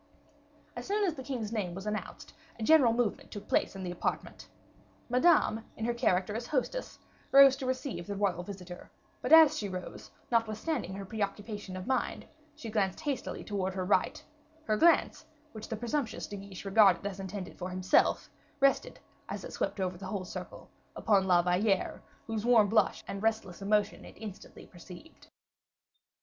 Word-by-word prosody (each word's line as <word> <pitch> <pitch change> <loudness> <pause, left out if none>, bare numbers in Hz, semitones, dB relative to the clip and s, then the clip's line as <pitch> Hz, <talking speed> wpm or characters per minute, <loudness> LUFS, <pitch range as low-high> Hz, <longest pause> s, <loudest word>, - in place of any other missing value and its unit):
As - - -7
soon 415 +1 +1
as 350 - 0
the 270 - -8
king's 250 -5 -4
name 195 -6 -2
was 195 +1 -7
announced 210 -3 -5 0.2
a 225 - -5
general 275 -2 +6
movement 230 -2 -1
took 205 -1 -9
place - - +1
in 190 - -6
the 180 - -3
apartment. 175 - -4 0.6
Madame, 250 -4 +3
in 225 - -3
her 240 - 0
character 205 -5 +1
as 235 +1 -4
hostess, 305 - -2 0.3
rose 275 -1 +8
to 265 -2 -5
receive 255 - -3
the 200 - -4
royal 195 -3 0
visitor; 180 -1 -9 0.3
but 250 - -3
as 320 -2 +9
she 205 - -3
rose, 185 -1 -7 0.2
notwithstanding 225 - -1
her 195 0 -6
preoccupation 205 -1 -4
of 185 - -6
mind, 260 0 -1 0.3
she 235 -8 -8
glanced 195 -4 0
hastily 290 -5 -3
towards 190 -2 -3
her 185 -1 -2
right; 195 - +1 0.4
her 215 - +1
glance, 335 +8 +3 0.3
which 215 -1 -8
the 225 - -3
presumptuous 240 0 -2
De 205 - -7
Guiche 195 -1 -9
regarded 195 -2 +5
as 200 -1 -4
intended 190 -1 -7
for 180 0 -4
himself, 185 +1 +2 0.3
rested, 275 0 +2 0.3
as - - -5
it - - -8
swept - - -2
over 180 -2 -2
the 195 - -7
whole 190 -1 -4
circle, - - -8 0.3
upon 195 -3 +2
La 175 -2 +4
Valliere, 185 +3 +1 0.2
whose 220 -2 -3
warm 230 -4 +5
blush 220 - +2
and 195 - -5
restless 220 -5 -1
emotion 205 0 +1
it - - -13
instantly 210 -4 -10
perceived. 180 - -14
210 Hz, 170 wpm, -30 LUFS, 190-240 Hz, 0.6 s, as